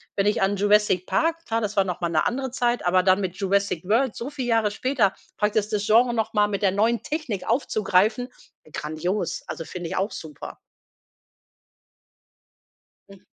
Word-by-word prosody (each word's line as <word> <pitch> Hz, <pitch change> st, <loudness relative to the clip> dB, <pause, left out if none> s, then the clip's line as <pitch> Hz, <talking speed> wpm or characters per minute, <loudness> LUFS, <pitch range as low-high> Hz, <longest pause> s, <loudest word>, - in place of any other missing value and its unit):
wenn 195 Hz, -, +1 dB
ich 210 Hz, -, +1 dB
an 195 Hz, +1 st, +2 dB
„Jurassic 205 Hz, -2 st, +3 dB
Park“ 330 Hz, +1 st, 0 dB
klar, 225 Hz, 0 st, 0 dB
das 210 Hz, -2 st, -3 dB
war 195 Hz, -, +4 dB
noch 180 Hz, -2 st, -4 dB
mal 170 Hz, -, 0 dB
‘ne 160 Hz, -2 st, +1 dB
andere 265 Hz, +2 st, -1 dB
Zeit, 240 Hz, -4 st, 0 dB
aber 180 Hz, +1 st, +3 dB
dann 190 Hz, +1 st, +4 dB
mit 185 Hz, -2 st, -3 dB
„Jurassic 195 Hz, -3 st, 0 dB
World“ 225 Hz, +5 st, +1 dB
so 245 Hz, +4 st, -5 dB
viel 275 Hz, -4 st, -5 dB
Jahre 225 Hz, -3 st, +2 dB
später, 230 Hz, -3 st, +1 dB, 0.2 s
praktisch, 210 Hz, 0 st, +1 dB
das 210 Hz, -1 st, -2 dB
Genre 235 Hz, +2 st, +4 dB
noch 220 Hz, -2 st, -1 dB
mal 210 Hz, 0 st, +3 dB
mit 200 Hz, -1 st, -3 dB
der 195 Hz, -2 st, +3 dB
neuen 225 Hz, +4 st, +1 dB
Technik 290 Hz, -, -4 dB
aufzugreifen: 215 Hz, 0 st, +1 dB, 0.4 s
grandios. 170 Hz, +6 st, -3 dB
Also, 155 Hz, +1 st, -6 dB
finde 175 Hz, -2 st, -6 dB
ich -, -, -4 dB
auch 195 Hz, +3 st, 0 dB
super. 155 Hz, -3 st, -9 dB, 2.5 s
Mm. 195 Hz, -1 st, -14 dB
205 Hz, 175 wpm, -24 LUFS, 185-235 Hz, 2.5 s, war